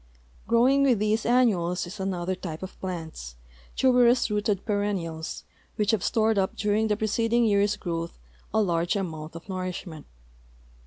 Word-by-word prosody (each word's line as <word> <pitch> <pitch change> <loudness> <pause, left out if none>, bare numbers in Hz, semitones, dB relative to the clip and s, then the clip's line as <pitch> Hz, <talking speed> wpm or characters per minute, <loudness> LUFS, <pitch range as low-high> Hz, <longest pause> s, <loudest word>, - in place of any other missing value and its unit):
Growing 250 +4 +4
with 265 -4 +4
these 215 +2 0
annuals 195 -9 +2
is 190 +4 -9
another 185 -1 -2
type 175 -3 -6
of 190 - -9
plants, 160 - -6 0.4
tuberous 245 -3 +4
rooted 210 -2 0
perennials, 195 -7 -2 0.3
whicb 210 +1 +2
have 220 -5 0
stored 220 -2 +2
u[) 190 -1 +3
during 210 +1 +1
the 210 -1 0
preceding 230 +2 +1
year's 205 -1 +3
growth 170 -1 -4 0.3
a 220 - +2
large 170 -1 0
amount 160 -5 -4
of 165 - -10
nourishment. 185 -4 -5
200 Hz, 145 wpm, -26 LUFS, 175-220 Hz, 0.4 s, Growing